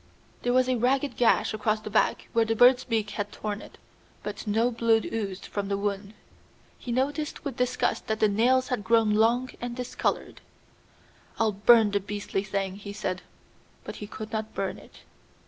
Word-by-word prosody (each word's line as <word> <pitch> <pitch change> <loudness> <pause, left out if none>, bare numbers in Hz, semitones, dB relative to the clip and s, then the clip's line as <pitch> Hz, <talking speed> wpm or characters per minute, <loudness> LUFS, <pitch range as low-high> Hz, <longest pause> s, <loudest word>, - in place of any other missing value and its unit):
There 245 - 0
was 255 0 +3
a 255 -1 +1
ragged 265 +3 +1
gash 240 -2 +3
across 215 0 0
the 215 - -7
back 215 - +1
where 230 - +4
the 225 0 0
bird's 250 +2 +6
beak 220 -3 -1
had 205 -1 -4
torn 210 0 -4
it, - - -13 0.5
but - - -6
no 225 +4 +2
blood 230 -1 +2
oozed 200 -4 -4
from 200 -1 -4
the 200 0 -1
wound. 200 +1 -3 0.6
He 245 - -6
noticed 290 +6 -2
with 275 -4 -4
disgust 250 0 0
that 220 0 -1
the 215 - +5
nails 250 +6 +2
had 250 -6 -1
grown 225 0 +3
long 235 +4 +2
and 240 0 -4
discolored. 250 -1 -3 1.0
"I'll 225 -1 +2
burn 215 +1 +5
the 200 - +2
beastly 205 -1 -3
thing," 195 -1 -3
he 200 0 -8
said. 185 -2 -3 0.6
But - - -7
he 210 - -7
could 215 +1 -8
not 220 -1 -4
burn - - -3
it. - - -17
220 Hz, 180 wpm, -27 LUFS, 205-245 Hz, 1.0 s, bird's